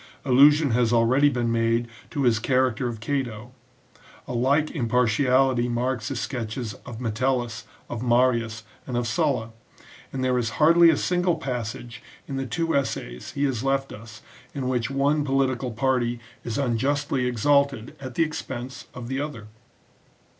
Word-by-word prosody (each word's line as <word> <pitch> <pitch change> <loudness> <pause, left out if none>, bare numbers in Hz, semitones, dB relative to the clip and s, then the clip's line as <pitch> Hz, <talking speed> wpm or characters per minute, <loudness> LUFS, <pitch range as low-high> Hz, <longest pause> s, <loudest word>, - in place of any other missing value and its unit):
Allusion 145 +2 +5
has 120 0 +2
already 125 +5 +4
been 120 -4 -1
made 115 +1 +1 0.2
to 145 -3 -2
his 115 -3 +3
character 130 0 +1
of 115 -2 -5
Cato, 120 -2 -3 0.8
a - - -5
like 140 +5 +2
impartiality 125 - +2
marks 120 -1 -1
his 135 -3 -3
sketches 115 -2 -4
of 115 -2 -7
Metellus, 120 0 -1 0.2
of 120 - -5
Marius, 120 -2 +1 0.2
and 125 -2 -2
of 120 - 0
Sulla: 130 -6 0 0.6
and 130 -1 -3
there 125 -1 +2
is 115 -2 -3
hardly 170 +2 +6
a 160 - +3
single 180 -1 +1
passage 120 -5 -5 0.3
in 140 - -5
the 135 0 -3
two 165 +3 -1
essays 60 - -3
he 140 - -2
has 130 -4 0
left 135 0 0
us 110 0 -12 0.3
in 135 -2 -2
which 125 -2 0
one 140 +2 +1
political 135 -2 0
party 120 0 0 0.2
is 115 - -3
unjustly 135 0 0
exalted 135 0 +1
at 130 -3 -8
the 165 - +3
expense 130 -5 -6
of 125 -1 -7
the 135 +2 -2
other. 115 -8 -6
125 Hz, 155 wpm, -25 LUFS, 115-135 Hz, 0.8 s, hardly